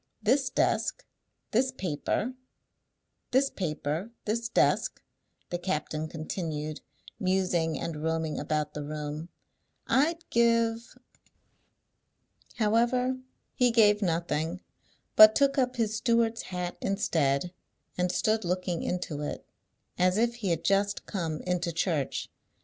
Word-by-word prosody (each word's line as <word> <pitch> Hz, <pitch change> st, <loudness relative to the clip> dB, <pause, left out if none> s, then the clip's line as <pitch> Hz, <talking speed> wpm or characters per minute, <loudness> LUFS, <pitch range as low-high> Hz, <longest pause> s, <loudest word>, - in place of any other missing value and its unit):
"This 265 Hz, +5 st, +3 dB
desk, -, -, 0 dB, 0.5 s
this 255 Hz, +4 st, +2 dB
paper, 195 Hz, -, -2 dB, 1.0 s
this 270 Hz, +2 st, +3 dB
paper, 160 Hz, +2 st, -3 dB, 0.2 s
this 230 Hz, +2 st, -1 dB
desk," -, -, +2 dB, 0.5 s
the 175 Hz, -, -1 dB
captain 155 Hz, -3 st, -2 dB
continued, 155 Hz, -1 st, -4 dB, 0.4 s
musing 180 Hz, -4 st, +1 dB
and 155 Hz, -3 st, -4 dB
roaming 160 Hz, -1 st, -1 dB
about 150 Hz, 0 st, -1 dB
the 150 Hz, -, -4 dB
room, 150 Hz, +2 st, -5 dB, 0.6 s
"I'd 325 Hz, +5 st, +1 dB
give 230 Hz, 0 st, +2 dB, 0.8 s
" -, -, -34 dB
However, 240 Hz, +3 st, +2 dB, 0.3 s
he 250 Hz, -1 st, +3 dB
gave 210 Hz, -3 st, +5 dB
nothing, 170 Hz, -1 st, -1 dB, 0.5 s
but 215 Hz, 0 st, +10 dB
took 275 Hz, 0 st, +3 dB
up 255 Hz, 0 st, +1 dB
his 220 Hz, -3 st, 0 dB
steward's 230 Hz, -1 st, +2 dB
hat 180 Hz, -1 st, -4 dB
instead, 170 Hz, -5 st, 0 dB, 0.4 s
and 180 Hz, 0 st, +1 dB
stood 220 Hz, +2 st, +1 dB
looking 180 Hz, -1 st, -1 dB
into 175 Hz, -4 st, -3 dB
it, 150 Hz, -, -5 dB, 0.5 s
as 180 Hz, +2 st, +3 dB
if 235 Hz, +1 st, +2 dB
he 235 Hz, -4 st, -5 dB
had 165 Hz, -1 st, 0 dB
just 200 Hz, +1 st, +1 dB
come 165 Hz, -6 st, -3 dB
into 180 Hz, -1 st, -1 dB
church. 160 Hz, -4 st, -1 dB
185 Hz, 115 wpm, -29 LUFS, 160-230 Hz, 1.0 s, but